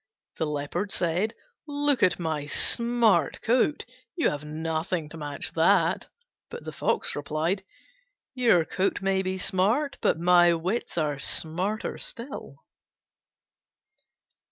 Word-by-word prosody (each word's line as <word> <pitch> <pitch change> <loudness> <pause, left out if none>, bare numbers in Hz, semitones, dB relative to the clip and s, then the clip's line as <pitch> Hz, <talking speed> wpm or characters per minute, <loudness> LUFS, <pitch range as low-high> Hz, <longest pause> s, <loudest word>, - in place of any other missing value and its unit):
The 160 - -1
Leopard 150 +7 -3
said, 180 +6 0 0.3
"Look 290 -3 +1
at 185 -3 +4
my 155 -4 -3
smart 230 - +2
coat; 255 +5 +2 0.3
you 335 - +2
have 145 0 -5
nothing 160 +1 -3
to 165 - -9
match 145 -2 -5
that." - - +3 0.4
But 475 +1 -8
the - - -6
Fox - - -1
replied, 155 +6 -1 0.7
"Your 230 -10 +4
coat 195 +3 -1
may 195 0 +2
be 190 0 -2
smart, 215 +11 0
but - - +2
my 175 0 +5
wits 180 +5 -3
are 150 -3 0
smarter 180 +9 -1
still." 235 - -5
180 Hz, 120 wpm, -27 LUFS, 160-220 Hz, 0.7 s, my